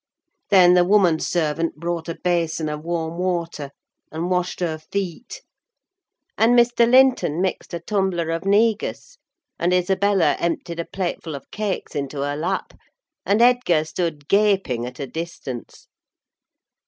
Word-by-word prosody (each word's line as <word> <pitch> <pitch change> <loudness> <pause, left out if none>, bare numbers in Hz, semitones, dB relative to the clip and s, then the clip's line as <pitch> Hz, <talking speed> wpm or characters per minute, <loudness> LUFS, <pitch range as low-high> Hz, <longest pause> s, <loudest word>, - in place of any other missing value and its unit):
Then 180 -3 +7
the 180 0 +5
woman 180 -4 +3
servant 165 -1 -1
brought 170 +1 -4
a 165 - -3
basin 165 -3 -1
of 150 0 -5
warm 165 0 -3
water, 170 -5 -2 0.4
and 165 +3 -3
washed 180 0 -1
her 165 -3 -2
feet; 200 - -5 1.0
and 235 +2 +5
Mr. 235 0 +4
Linton 250 - +4
mixed 185 0 -2
a 170 - -4
tumbler 180 -3 -1
of 165 +1 -2
negus, 210 +2 0 0.4
and 175 +1 +1
Isabella 190 +1 +2
emptied 170 0 -3
a 170 - -2
plateful 175 -4 -4
of 140 - -11
cakes 210 -2 -3
into 140 0 -4
her 145 +1 -2
lap, 155 +3 -3 0.5
and 210 +4 +4
Edgar 240 -11 +3
stood 155 -3 -4
gaping 195 - +2
at 125 0 -10
a 140 - -3
distance. 135 -5 -7
175 Hz, 140 wpm, -22 LUFS, 160-195 Hz, 1.0 s, Then